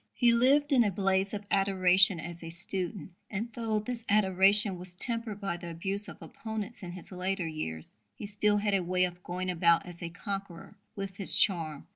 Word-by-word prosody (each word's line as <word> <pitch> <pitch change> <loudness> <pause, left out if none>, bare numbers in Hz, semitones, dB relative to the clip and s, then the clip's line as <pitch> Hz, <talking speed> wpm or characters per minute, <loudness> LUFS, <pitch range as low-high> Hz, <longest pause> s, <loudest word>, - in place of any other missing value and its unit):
He 240 -2 +4
lived 275 +5 +3
in 250 -3 +5
a 210 - +1
blaze 195 0 0
of 205 -1 -6
adoration 190 -2 +5
as 170 +1 -8
a 165 - -7
student, 185 0 -4 0.2
and, 220 +3 -5
though 225 -2 -2
this 230 +2 -3
adoration 195 -1 +6
was 180 0 -8
tempered 230 0 -4
by 195 -4 -3
the 175 -1 -8
abuse 195 +5 -2
of - - -11
opponents 220 0 -5
in 175 -2 -7
his 180 +1 -6
later 185 0 -3
years, 80 - -5 0.2
he - - -8
still 205 0 +1
had 205 0 -1
a 195 - +2
way 180 +1 0
of 180 0 -3
going 180 +1 -4
about 170 -1 +2
as 175 -1 -7
a 170 - -5
conqueror 195 0 -7 0.2
with 195 -1 -6
his 195 - +2
charm. 160 -7 0
195 Hz, 195 wpm, -29 LUFS, 180-210 Hz, 0.2 s, adoration